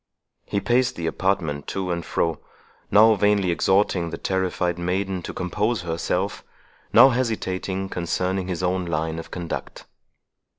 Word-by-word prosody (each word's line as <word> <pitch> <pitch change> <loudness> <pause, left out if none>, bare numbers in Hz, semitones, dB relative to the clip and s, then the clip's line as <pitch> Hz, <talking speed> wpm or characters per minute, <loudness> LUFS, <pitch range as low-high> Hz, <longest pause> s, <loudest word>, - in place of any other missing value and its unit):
He 100 - 0
paced 125 +4 +1
the 85 - -4
apartment 80 -4 -1
to 95 -2 -2
and 85 -1 -2
fro, 80 -1 -1 0.5
now 110 +2 +7
vainly 100 -2 +2
exhorting 95 -1 +2
the - - -5
terrified 90 -2 -1
maiden 95 +1 -1
to - - -6
compose 105 +3 -1
herself, 85 -1 -2 0.5
now 135 - +8
hesitating 95 -6 -2
concerning 90 +2 -1
his 90 -1 -3
own 90 0 0
line 80 0 -2
of 80 - -9
conduct. 85 -2 -6
95 Hz, 135 wpm, -24 LUFS, 85-100 Hz, 0.5 s, now